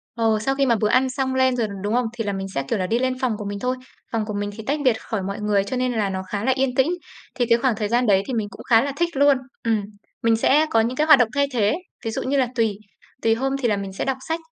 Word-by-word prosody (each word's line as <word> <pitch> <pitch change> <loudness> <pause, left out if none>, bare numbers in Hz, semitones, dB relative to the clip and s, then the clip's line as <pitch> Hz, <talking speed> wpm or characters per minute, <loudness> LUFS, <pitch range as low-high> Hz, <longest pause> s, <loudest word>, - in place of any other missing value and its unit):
Ồ, 225 -2 +2
sau 270 +5 0
khi 275 - +2
mà 240 -3 +3
bữa 210 -1 +1
ăn 260 +3 +3
xong 260 0 -2
lên 260 -1 +3
rồi, 230 -3 0 0.2
đúng 205 +2 -1
không? 245 -1 +2
Thì 235 -2 -3
là 205 - -2
mình 195 0 -4
sẽ, 140 - 0
kiểu 195 - -1
là, 185 - -1
đi 230 +4 +1
lên 255 0 -1
phòng 255 -3 0
của 210 - -6
mình 200 0 -4
thôi. 250 +4 -1 0.4
Phòng 225 -2 -1
của 210 - -5
mình 205 0 -2
thì 220 - -7
tách 295 +2 0
biệt 255 -4 +5
khỏi 220 -4 -3
mọi 200 +1 -4
người, 205 -2 +2
cho 225 +6 -4
nên 255 0 0
là 215 -4 0
nó 190 0 -3
khá 205 0 -3
là 260 - +3
yên 260 -1 0
tĩnh. 265 +4 +3 0.5
Thì 245 - +1
cái 235 0 +4
khoảng 245 -1 +1
thời 210 -1 -2
gian 240 +2 +1
đấy 195 -1 +4
thì 260 - -3
mình 220 -3 -1
cũng 195 - -11
khá 230 -2 +6
là 280 - -2
thích 345 0 +1
luôn. 285 -1 +5 0.3
Ừm, 225 -2 +1 0.4
mình 230 -1 +4
sẽ 290 +7 +3
có 225 - +3
những 235 +3 -1
cái 305 - +2
hoạt 305 -4 +8
động 240 -3 +3
thay 280 - +3
thế, 215 -2 +2 0.3
ví 225 - -1
dụ - - -3
như 275 +2 0
là 260 - +3
tùy 225 -4 +1 0.4
tùy 225 0 +3
hôm 270 +3 -1
thì 240 - +2
là 210 - +1
mình 195 -1 -5
sẽ 195 - -3
đọc 265 -1 -1
sách, 325 +1 -1
230 Hz, 315 wpm, -22 LUFS, 210-260 Hz, 0.5 s, hoạt